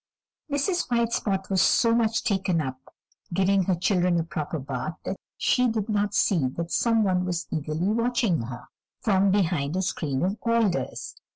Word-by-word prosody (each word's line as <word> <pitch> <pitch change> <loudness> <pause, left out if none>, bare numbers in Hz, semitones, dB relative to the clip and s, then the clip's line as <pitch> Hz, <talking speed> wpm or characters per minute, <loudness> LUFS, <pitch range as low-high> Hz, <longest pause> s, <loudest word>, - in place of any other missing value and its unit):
Mrs. 340 +5 0
White 235 -1 +1
Spot 195 -2 -1
was 190 -2 +3
so 230 +6 +4
very 235 +1 +3
much 225 +1 -1
taken 190 -5 +1
up 130 -3 -5 0.4
giving 195 0 +3
her 185 - +2
children 180 -1 +2
a - - 0
proper 160 -1 -4
bath 155 +3 -4
that - - -2 0.2
she 250 0 +2
did 220 -2 -2
not 205 -1 0
see 165 -10 +2
that 165 +6 -5
some 230 -2 +2
one 185 -2 +1
was 180 -1 -2
eagerly 155 +4 -1
watching 230 - +1
her 120 +1 -8 0.3
from 200 -4 +3
behind 175 -6 +1
a 190 - 0
screen 145 -6 -2
of 195 +4 -1
alders. 230 -6 0
190 Hz, 175 wpm, -26 LUFS, 165-220 Hz, 0.4 s, so